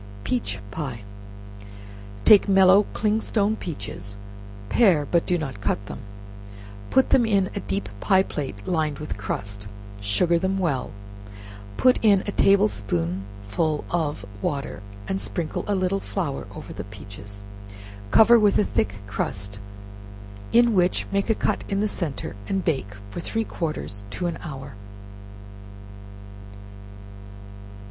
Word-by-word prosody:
Peach 105 -3 -1
Pie. 135 -9 -5 1.2
Take 205 -1 +7
mellow 190 +1 +6
clingstone 215 0 +1
peaches, 100 - -6 0.5
pare, 175 - +4
but 170 +3 +1
do 180 - +2
not 135 -11 -5
cut 100 0 -1
them; - - -7 0.9
put 265 - +3
them 250 - +6
in 200 -4 +2
a - - -3
deep 100 0 -3
pie 190 - +4
plate 130 - -5
lined 155 -5 0
with 155 - -5
crust, 100 0 -4 0.3
sugar 165 - +2
them 190 +2 0
well, 150 -9 0 0.9
put 255 -1 +5
in 200 -3 +5
a 205 - -2
table 200 +1 +5
spoonful 100 - -2
of 150 -11 -1 0.2
water, 140 -6 -3 0.3
and 95 - -1
sprinkle 105 +11 -3
a 205 - +1
little 190 +1 +1
flour 170 -9 -3
over - - -8
the - - -6
peaches; 100 0 -11 0.7
cover 230 - +7
with 210 -2 +4
a - - +4
thick 100 -1 0
crust, 100 0 -4 0.9
in 235 0 +5
which 180 -2 +2
make 200 +2 0
a 225 - +4
cut - - 0
in 195 - 0
the 210 - +2
centre, 165 - -4
and 195 -1 0
bake 130 - -1 0.2
from 175 - -5
three 225 +5 -1
quarters 150 - -4
to 100 - -5
one 170 - -1
hour. 135 -4 -7
155 Hz, 130 wpm, -24 LUFS, -, 1.2 s, Take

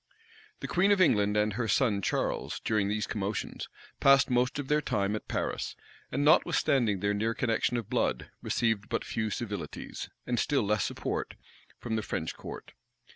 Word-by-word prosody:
The - - -3
queen 195 +3 +3
of 200 - +4
England 105 - +4
and 105 0 +2
her 115 +2 -1
son 105 -4 +2
Charles, - - -1
during 105 -3 +1
these 105 +1 -1
commotions, 105 0 -3 0.3
passed 140 -1 +5
most 125 +2 +2
of 145 -2 -4
their 150 +1 +2
time 100 -6 0
at 110 - -6
Paris; - - -2 0.4
and 140 +2 0
notwithstanding 120 -8 +3
their 100 0 +1
near 110 +3 0
connection 120 +1 +1
of 115 -4 -4
blood, - - -1
received 110 -3 0
but 115 - -1
few 110 -1 -2
civilities, 105 -3 -5 0.2
and 120 -1 0
still 145 -5 +2
less 105 +1 +1
support, - - -3 0.4
from 110 -2 -3
the - - 0
French 80 -6 -3
court. - - -9
110 Hz, 170 wpm, -30 LUFS, 105-125 Hz, 0.4 s, passed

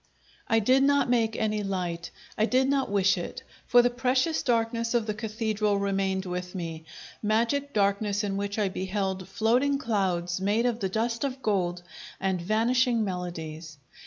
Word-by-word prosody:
I 225 - +3
did 255 +5 +4
not 280 -2 +3
make 225 -2 +2
any 215 -1 0
light; 180 -4 -3 0.3
I 215 - +2
did 260 +2 +3
not 275 -1 +1
wish 195 -2 +3
it, 175 - -6 0.2
for 245 0 +6
the 245 - +2
precious 255 +5 +1
darkness 230 -1 0
of 235 -2 +2
the 215 - -2
Cathedral 215 -1 -1
remained 195 -1 0
with 180 +1 -5
me 165 -3 -5 0.4
magic 235 +7 +1
darkness 205 0 +1
in 200 -1 -2
which 200 +1 -3
I 210 -2 +2
beheld 190 0 -3
floating 245 +8 +2
clouds 185 -7 -1
made 210 +5 +1
of 240 -2 0
the 195 -4 -1
dust 230 +4 -1
of 265 -2 -3
gold 180 -4 0 0.4
and 190 -2 -1
vanishing 230 +4 +2
melodies. 165 -5 -5
210 Hz, 160 wpm, -27 LUFS, 190-235 Hz, 0.4 s, for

